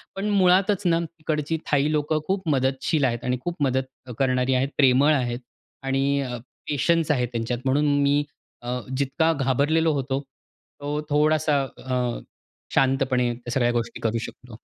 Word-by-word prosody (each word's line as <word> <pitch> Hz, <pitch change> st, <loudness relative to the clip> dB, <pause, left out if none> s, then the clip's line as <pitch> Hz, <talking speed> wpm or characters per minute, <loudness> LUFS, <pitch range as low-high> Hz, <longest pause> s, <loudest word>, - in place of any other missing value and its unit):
पण 195 Hz, +2 st, -2 dB
मुळातच 195 Hz, 0 st, +3 dB
ना 165 Hz, -1 st, +3 dB
तिकडची 155 Hz, -1 st, -3 dB
थाई 145 Hz, +1 st, +2 dB
लोकं 155 Hz, +1 st, 0 dB
खूप 190 Hz, -2 st, -1 dB
मदतशील 135 Hz, +2 st, +1 dB
आहेत 120 Hz, -1 st, -1 dB
आणि 125 Hz, 0 st, 0 dB
खूप 175 Hz, +3 st, -3 dB
मदत 130 Hz, -1 st, -2 dB
करणारी 130 Hz, -1 st, +2 dB
आहेत, 130 Hz, +2 st, +1 dB
प्रेमळ 140 Hz, +2 st, +5 dB
आहेत. 120 Hz, -4 st, -1 dB, 0.4 s
आणि 135 Hz, +1 st, +1 dB
अ, 125 Hz, -2 st, -4 dB, 0.3 s
पेशन्स 165 Hz, +2 st, +2 dB
आहेत 125 Hz, -4 st, +1 dB
त्यांच्यात 115 Hz, +1 st, -2 dB
म्हणून 145 Hz, +3 st, +2 dB, 0.2 s
मी 145 Hz, +1 st, +3 dB, 0.4 s
अ, 125 Hz, +1 st, -3 dB, 0.2 s
जितका 140 Hz, +4 st, +1 dB
घाबरलेलो 145 Hz, +4 st, +2 dB
होतो, 135 Hz, -1 st, -1 dB, 0.6 s
तो 145 Hz, +1 st, -2 dB
थोडासा 150 Hz, 0 st, +2 dB, 0.2 s
अ, 125 Hz, -2 st, -1 dB, 0.6 s
शांतपणे 130 Hz, -2 st, +2 dB
त्या 120 Hz, 0 st, -9 dB
सगळ्या 120 Hz, -1 st, +2 dB
गोष्टी 115 Hz, -1 st, -3 dB
करू 115 Hz, 0 st, 0 dB
शकलो. 125 Hz, -3 st, -13 dB
135 Hz, 145 wpm, -24 LUFS, 125-155 Hz, 0.6 s, प्रेमळ